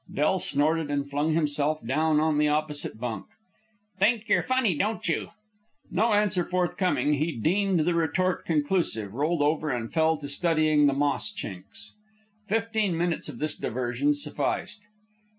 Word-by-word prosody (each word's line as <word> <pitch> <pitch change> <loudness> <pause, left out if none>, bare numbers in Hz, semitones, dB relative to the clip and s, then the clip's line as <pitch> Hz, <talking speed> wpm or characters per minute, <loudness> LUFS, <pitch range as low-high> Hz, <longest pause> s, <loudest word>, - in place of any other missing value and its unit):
Del 155 +6 +1
snorted 155 0 0
and 140 -1 -1
flung 145 +3 0
himself 150 -2 0
down 155 +5 +2
on 155 -1 +1
the 150 - +3
opposite 150 -5 -1
bunk. 115 -4 -4 0.7
"Think 220 +3 +2
yer - - +3
funny, 255 -8 +1
don't 215 +8 -2
you?" - - -1 0.6
No 220 +4 +2
answer 205 -3 +2
forthcoming, 180 -3 0
he 155 +3 0
deemed 185 - +1
the 175 +3 +1
retort 170 +3 0
conclusive, 150 - -1
rolled 150 +4 0
over, 155 +1 0
and 120 -4 -3
fell 160 -1 +2
to 145 -1 -7
studying 155 0 +3
the 140 - +2
moss 145 +7 0
chinks. 100 - -8 0.6
Fifteen 220 -4 0
minutes 170 -2 -1
of 135 - -8
this 150 +2 0
diversion 125 +4 -1
sufficed. 150 +7 -2
155 Hz, 150 wpm, -26 LUFS, 145-180 Hz, 0.7 s, the